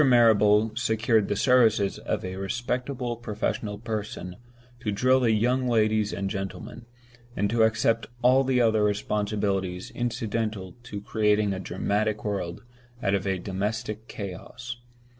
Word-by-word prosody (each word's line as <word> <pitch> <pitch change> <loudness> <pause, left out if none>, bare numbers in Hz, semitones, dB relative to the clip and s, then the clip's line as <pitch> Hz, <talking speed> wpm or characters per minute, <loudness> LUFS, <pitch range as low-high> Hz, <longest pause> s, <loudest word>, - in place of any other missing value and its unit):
Marrable 110 -4 +5
secured 110 -2 +2
the 100 - 0
services 110 -4 +3
of - - -3
a 95 0 -4
respectable 125 +5 -2
professional 105 -2 -3
person 105 -5 -5 0.4
to 110 -4 -2
drill 130 +6 +3
the 120 -3 +2
young 125 +4 +2
ladies 110 -2 +2
and 100 0 -2
gentlemen, 105 +5 -6 0.5
and 100 0 0
to 115 -1 +2
accept 115 +1 +2 0.2
all 130 +2 +5
the 130 -1 +2
other 110 -3 +3
responsibilities 100 -3 -1
incidental 110 -5 -2
to 105 -4 -7
creating 105 -1 +2
a 95 - -4
dramatic 105 +3 -1
world 95 -4 -3 0.4
out 100 - +2
of 100 0 0
a 95 -1 +1
domestic 105 +4 -3
chaos. 115 +6 -7
110 Hz, 135 wpm, -26 LUFS, 100-120 Hz, 0.5 s, Marrable